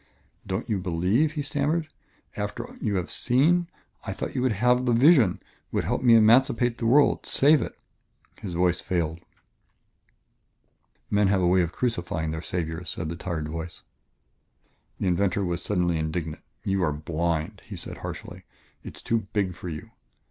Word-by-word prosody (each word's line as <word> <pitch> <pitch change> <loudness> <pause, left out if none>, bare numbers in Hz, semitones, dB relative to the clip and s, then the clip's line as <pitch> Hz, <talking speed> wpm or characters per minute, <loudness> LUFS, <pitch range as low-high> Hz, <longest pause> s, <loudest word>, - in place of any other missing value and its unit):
"Don't 95 +3 -3
you 105 -5 0
believe?" 95 - +1
he 150 -2 -2
stammered. 150 +3 -1 0.5
"After - - -5
you 105 - 0
have 90 -2 -2
seen... 160 +8 +2 0.4
I - - -4
thought - - -5
you 125 - -1
would 130 -1 +2
have 125 +4 +2
the 120 - +3
vision, 125 - +5 0.3
would - - 0
help - - -1
me 120 -2 +6
emancipate 115 +1 +4
the 115 - 0
world, 140 +4 +4
save 145 0 +4
it - - -5 0.3
" - - -29
His 90 -4 -5
voice 90 0 +2
failed. 85 -3 -1 1.9
"Men 105 -1 +3
have 95 -1 +2
a - - +2
way 90 +1 +4
of 85 -2 -1
crucifying 85 -10 -2
their 80 0 -4
saviors," 85 0 -4
said 80 - -4
the 85 - -4
tired 85 -3 -4
voice. 80 +2 -6 1.2
The - - -2
inventor 95 +2 +1
was 85 -1 -2
suddenly 90 -4 0
indignant. 80 0 -3 0.2
"You 95 0 0
are 80 - +2
blind," 85 +4 -2
he - - -8
said - - -7
harshly; - - -7 0.4
"it - - -9
is - - -9
too 115 -3 0
big 100 -3 0
for 90 - -7
you. 75 -2 -7
95 Hz, 170 wpm, -26 LUFS, 85-120 Hz, 1.9 s, me